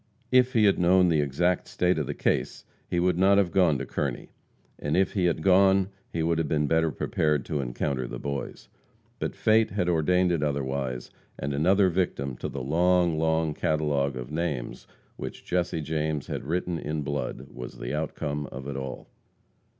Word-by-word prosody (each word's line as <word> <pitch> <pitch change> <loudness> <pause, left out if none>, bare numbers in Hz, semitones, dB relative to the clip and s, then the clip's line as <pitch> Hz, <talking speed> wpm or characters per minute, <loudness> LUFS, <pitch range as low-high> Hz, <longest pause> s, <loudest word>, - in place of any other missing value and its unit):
If 130 0 +4
he 115 -3 +4
had 100 -2 +4
known 90 +1 +5
the 80 -3 +3
exact 85 +6 0
state 90 -2 +1
of 75 - -2
the - - -3
case - - -1 0.2
he 85 - 0
would 90 0 +1
not 100 +1 +5
have 95 -4 +2
gone 90 -7 +3
to - - -4
Kearney, - - -3 0.5
and 75 +3 -1
if 95 - +2
he 95 -4 +1
had 85 -2 0
gone 95 +1 +4 0.2
he 80 - -1
would 85 0 +1
have 80 - 0
been 75 0 +1
better 80 +2 +2
prepared 75 +1 0
to 75 - -2
encounter 65 +1 -2
the - - -6
Boys. 70 +2 -5 0.5
But - - -3
fate 110 0 +3
had 90 -3 -1
ordained 90 +2 +2
it 85 -3 0
otherwise, 70 -3 -2 0.3
and 70 +1 -3
another 95 +7 +3
victim 70 -7 -1
to - - -4
the 70 - -5
long, 85 +2 +2
long 80 -1 +1
catalogue 75 -3 0
of 60 +2 -7
names 75 -6 -3 0.3
which - - -7
Jesse 90 -2 -1
James 75 -1 -2
had - - -5
written 85 +2 -1
in 75 -1 -3
blood 70 +1 -4
was 60 0 -8
the - - -5
outcome 75 -1 -3
of 65 +1 -8
it 70 - -4
all. 65 -1 -6
80 Hz, 185 wpm, -27 LUFS, 70-90 Hz, 0.5 s, known